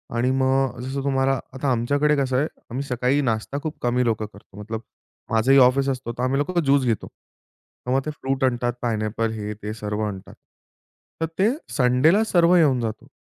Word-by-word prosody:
आणि 125 +2 +1
मग 130 -1 +1
जसं 135 +2 -4
तुम्हाला 135 -1 +1
आता 130 +1 -1
आमच्याकडे 145 +5 +2
कसं 130 -2 +1
आहे 150 - +1 0.2
आम्ही 130 +4 -3
सकाळी 125 +2 +1
नाश्ता 115 +1 -1
खूप 155 -1 -4
कमी 125 0 +1
लोकं 110 -2 0
करतो. 100 0 -15
मतलब 110 +1 -5 0.5
माझंही 115 +5 +4
ऑफिस 135 +2 +4
असतं, 130 -3 -3
तर 125 - -2
आम्ही 130 +2 +1
लोकं 170 +4 0
ज्यूस 140 -2 +3
घेतो. 115 -3 -1
तर 125 - -13
मग 135 - +3
ते 155 - -2
फ्रूट 135 -2 -3
आणतात 120 -2 +1
पाईनएपल 110 -1 -1
हे, 105 -1 -4
ते 105 0 -6
सर्व 105 -1 -4
आणतात. 95 -2 -8 0.9
तर - - +2
ते 205 +4 +4 0.3
संडेला 140 - +4
सर्व 175 -4 +4
येऊन 145 -7 +4
जातं. 110 -1 -5
130 Hz, 180 wpm, -23 LUFS, 115-140 Hz, 0.9 s, माझंही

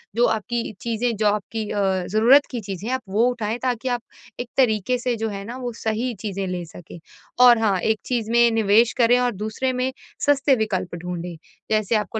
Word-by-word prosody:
जो 240 +1 +4
आपकी 230 +1 -4
चीज़ें 235 0 -1
जो 215 - +2
आपकी 210 +2 -1
अ, 205 - -1 0.3
ज़रूरत 240 +8 +5
की 245 - -3
चीज़ें 195 +1 -6
हैं, 260 - +1
आप 260 - -4
वो 215 +4 +2
उठाएँ, 225 -1 -3
ताकि 250 0 -1
आप 245 -1 -1 0.4
एक 245 0 -5
तरीके 245 -1 +2
से 245 0 -1
जो 225 0 -3
है 200 -1 -6
ना 240 +3 -7
वो 245 -2 -4
सही 230 +3 -1
चीज़ें 195 -2 -3
ले 180 -1 -3
सकें। 170 +1 -12 0.5
और 240 -1 +8
हाँ 200 -4 +1
एक 220 +3 0
चीज़ 230 -3 -2
में 235 0 +5
निवेश 225 +1 +3
करें 245 +1 +4
और 245 -1 +1
दूसरे 255 +4 -2
में 255 +1 -1 0.3
सस्ते 280 -1 +3
विकल्प 190 -5 -2
ढूँढें, 175 0 -6 0.4
जैसे 215 +1 +1
आपको 210 +1 -1
225 Hz, 200 wpm, -22 LUFS, 205-245 Hz, 0.5 s, और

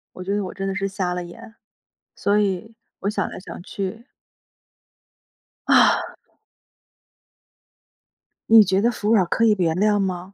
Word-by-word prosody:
我 185 - -7
觉 200 +2 -2
得 205 - -1
我 185 - -6
真 195 0 -4
的 195 - -3
是 195 0 -1
瞎 190 -2 -3
了 180 0 -4
眼， 175 +6 -13 0.6
所 205 +1 +1
以 205 +3 -2 0.3
我 200 - -2
想 210 - -2
来 - - -9
想 180 - -10
去 205 +5 -6 1.6
啊。 - - +4 2.4
你 225 -1 +9
觉 190 +1 +1
得 235 +2 +2
服 210 -1 -2
软 195 -4 +4
儿 - - -6
可 230 - +1
以 215 -2 +4
原 165 -2 +1
谅 205 +2 +2
吗？ 185 0 -3
195 Hz, 170 characters per minute, -22 LUFS, 185-210 Hz, 2.4 s, 你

